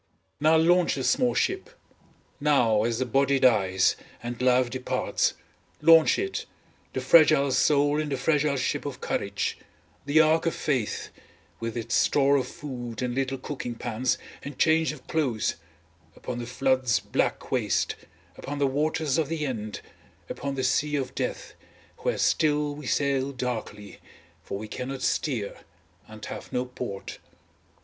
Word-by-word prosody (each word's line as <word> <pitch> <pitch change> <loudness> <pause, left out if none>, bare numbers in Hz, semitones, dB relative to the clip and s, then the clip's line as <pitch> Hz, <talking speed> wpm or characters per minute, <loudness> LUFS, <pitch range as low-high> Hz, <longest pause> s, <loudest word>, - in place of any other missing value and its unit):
Now 155 +2 +5
launch 175 +2 +3
the 135 - -3
small 245 - +2
ship, 380 +4 0 0.7
now 120 -8 +3
as 115 -1 0
the 130 - 0
body 135 +3 +2
dies 95 -8 +3 0.3
and 120 0 -5
life 125 -1 +3
departs, 130 -1 -1 0.4
launch 165 -1 +6
out, 390 0 -2 0.5
the - - -2
fragile 155 -4 +5
soul 145 +2 +3
in 150 - -4
the 135 - -1
fragile 145 +1 +1
ship 125 - -1
of - - -6
courage, - - -2 0.5
the 145 +2 +4
ark 160 +1 +4
of 165 - 0
faith 130 -8 -2 0.5
with 115 0 -4
its 115 +1 -4
store 140 +2 +3
of 130 - -1
food 120 -5 -6
and 125 -1 -1
little 135 +1 -1
cooking 130 -3 -5
pans 120 +2 -1 0.2
and 140 -1 -8
change 160 0 +3
of 145 -4 -12
clothes, 130 - -1 0.6
upon 120 -1 -6
the 120 - -5
flood's 130 -1 +1
black - - -2
waste - - 0 0.4
upon 145 +1 -5
the 140 - +2
waters 150 +2 0
of 155 - +1
the 160 -2 -2
end 110 -6 -4 0.5
upon 140 0 -4
the 130 - -2
sea 150 +3 +1
of 135 -3 -2
death, - - -4 0.5
where - - -1
still 150 -2 +2
we 145 -2 -8
sail 140 -1 +1
darkly, 115 -5 -5 0.4
for - - -5
we 110 +2 -7
cannot 130 +3 -5
steer, 125 -5 -1 0.5
and 110 -1 -10
have - - -8
no 125 0 -1
port. 125 -5 -7
135 Hz, 150 wpm, -26 LUFS, 120-150 Hz, 0.7 s, launch